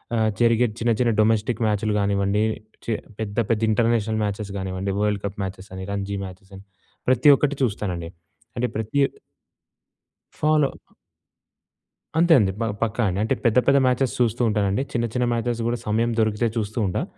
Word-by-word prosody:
ఆహ్, 110 -1 +2
జరిగే 115 +1 +4
చిన్న, 115 0 +1
చిన్న 120 -2 +3
డొమెస్టిక్ 110 +1 +1
మ్యాచ్‍లు 105 0 0
గానివ్వండి 100 +1 +1 0.4
చే 115 - 0 0.3
పెద్ద, 105 -1 -4
పెద్ద 110 -1 +1
ఇంటర్నేషనల్ 110 -1 +1
మ్యాచెస్ 105 -1 -3
గానివ్వండి, 95 +1 -3
వరల్డ్ 105 -1 0
కప్ 100 +1 -5
మ్యాచెస్ 95 +1 -7
అని 95 0 -6
రంజీ 100 0 -3
మ్యాచెస్ 95 +1 -12
అని 95 - -13 0.5
ప్రతి 130 +4 +5
ఒక్కటి 145 -1 0
చూస్తానండి. 90 -7 -2 0.5
అంటే 125 +1 +1
ప్రతి 110 +6 -1 1.4
ఫాలో 150 -2 +3 1.5
అంతే 170 0 +5
అండి. 95 -3 +2
బ - - 0 0.2
పక్కా 115 +2 0
అండి. 95 +2 -2
అంటే 110 - +1
పెద్ద, 115 +1 +4
పెద్ద 140 0 +5
మ్యాచెస్ 125 0 +1
చూస్తూ 120 0 +1
ఉంటానండి. 105 +2 +1
చిన్న, 120 -1 0
చిన్న 125 -1 +1
మ్యాచెస్ 115 0 -1
కూడా 120 0 -1
సమయం 115 +3 +1
దొరికితే 110 +1 +1
చూస్తూ 110 +1 -2
ఉంటా. 90 - -1
110 Hz, 155 wpm, -23 LUFS, 100-120 Hz, 1.5 s, ప్రతి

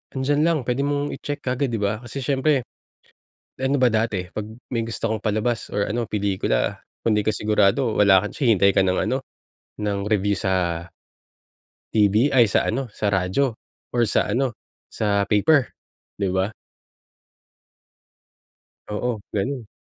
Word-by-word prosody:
Nandiyan 145 +3 +1
lang. 165 -2 +3
Puwede 125 +3 -1
mong 145 0 -1
itsek 145 0 -5
kaagad 130 +2 0
,'di 115 -3 -2
ba? 105 +2 0
Kasi 130 +2 -6
siyempre, 135 0 +2 1.0
ano 135 +2 +1
ba 125 - +5
dati? 110 -5 -1
'Pag 105 0 -5 0.2
may 115 -2 -1
gusto 115 -1 -3
kang 110 - 0
palabas 110 +2 -1
or 105 - +1
ano, 115 +1 -1
pelikula, 100 - 0 0.2
kung 115 - +2
hindi 105 - -1
ka 110 - +2
sigurado, 105 +3 +2
wala 95 -2 +6
kang 105 - -4
chi 120 -6 +3
hintay 100 0 +4
ka 95 - +3
ng 90 - +1
ano, 130 +1 -1 0.6
ng 105 -1 -1
review 100 -1 +1
sa 85 -3 0 1.1
TV 110 +6 +3
ay, 120 -5 +5
sa - - +2
ano, 125 +2 -2
sa 105 0 -1
radyo 95 +8 +1 0.4
or 120 - +3
sa - - +2
ano, 120 +2 -1 0.3
sa 100 -2 0
paper, 135 +6 +4 0.5
di 100 - 0
ba? 95 +2 +1 2.4
Oo, 110 +1 -2 0.2
ganun. 125 +3 -2
110 Hz, 150 wpm, -23 LUFS, 100-130 Hz, 2.4 s, wala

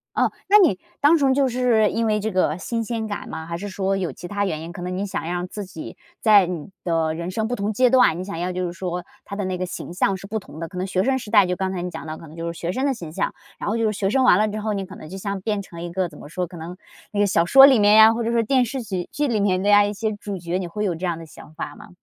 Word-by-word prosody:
哦， - - +2 0.2
那 415 - +8
你 315 - +4 0.2
单纯 285 -3 +4
就 275 0 +3
是 240 -4 +2
因 230 +1 0
为 210 -1 +1
这 220 +1 -2
个 180 -3 +1
新 230 +4 -3
鲜 225 -1 -3
感 205 - -5
吗， 160 0 -6
还 170 0 -4
是 205 +2 -6
说 195 0 -1
有 185 -3 -2
其 175 - -9
他 205 +1 -1
原 160 -4 -3
因？ 165 +1 -7
可 175 - -9
能 180 +1 -3
你 200 - -1
想 200 -2 -4
让 175 +1 -2
自 205 +2 -6
己 165 -3 -9 0.2
在 205 -4 +6
你 175 -1 -5
的 165 -2 0
人 170 +2 -4
生 220 +3 -1
不 245 - -2
同 205 0 -2
阶 250 +3 +3
段， 250 -10 +5
你 - - -3
想 185 -4 -6
要 180 +1 -2
就 180 0 -2
是 175 - -4
说 180 -1 -4 0.2
他 200 - -7
的 200 -2 -2
那 185 -1 -2
个 185 - -2
形 175 - -7
象 195 +1 +1
是 195 - -11
不 220 +1 -2
同 160 -4 -12
的， 165 - -4
可 180 - -10
能 185 - -1
学 185 0 0
生 265 +1 +2
时 210 - -9
代 205 -3 +6
就 180 0 -1
刚 190 0 -2
才 180 -2 -3
你 180 - -3
讲 160 0 -7
到 155 - -5
可 165 - -12
能 155 - -13
就 170 0 -4
是 170 - -11
学 175 +1 -2
生 260 +7 -1
的 275 - +2
形 170 -10 -8
象， - - -1 0.3
然 - - -3
后 225 - 0
就 225 - +1
是 215 - +1
学 195 -1 -1
生 260 +3 +2
完 185 - +6
了 215 - +3
之 215 0 -4
后， 215 0 -2
你 195 -1 -2
可 195 +1 -11
能 155 - -10
就 190 - -8
像 200 0 -3
变 210 -1 -1
成 170 -3 -10
一 175 0 -5
个 180 -1 -1
怎 150 - -14
么 - - -11
说， 180 +3 -3
可 175 0 -11
能 165 +3 -7 0.4
那 205 - -2
个 205 - +4
小 170 -2 +2
说 270 +7 +9
里 265 -4 +6
面 205 0 +5
呀， 220 +1 +8
或 235 0 -2
者 230 - -1
是 230 -1 +2
电 255 +1 +3
视 260 +2 -4
剧 190 -6 -4
剧 295 0 0
里 225 -4 0
面 185 -2 +1
的 205 - +1
呀， 205 0 +7
一 205 - -2
些 215 +1 -2
主 205 -1 -6
角， 175 +1 -3
你 185 -2 -3
会 210 +5 -4
有 175 -4 0
这 180 +3 -4
样 170 -2 -1
的 165 - -9
想 155 0 -14
法 160 - -6
吗？ - - -13
195 Hz, 355 characters per minute, -23 LUFS, 175-220 Hz, 0.4 s, 说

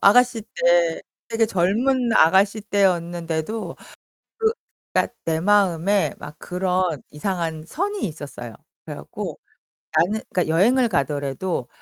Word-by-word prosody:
아가씨 245 +2 +5
때, 170 -1 +3 0.3
되게 225 0 +2
젊은 230 +7 +1
아가씨 195 +6 +4
때였는데도 175 -1 -1 1.2
그러니까 - - +1
내 160 -1 0
마음에 195 0 +2
막 150 +1 -9
그런 180 -4 -1
이상한 165 -1 -3
선이 395 - -3
있었어요. 140 -7 -8 0.3
그래 - - -6
갖고 - - -7 0.6
나는 195 +7 +2
그러니까 180 -2 +1
여행을 230 +11 +4
가더라도 140 - -1
180 Hz, 270 characters per minute, -23 LUFS, 160-210 Hz, 1.2 s, 아가씨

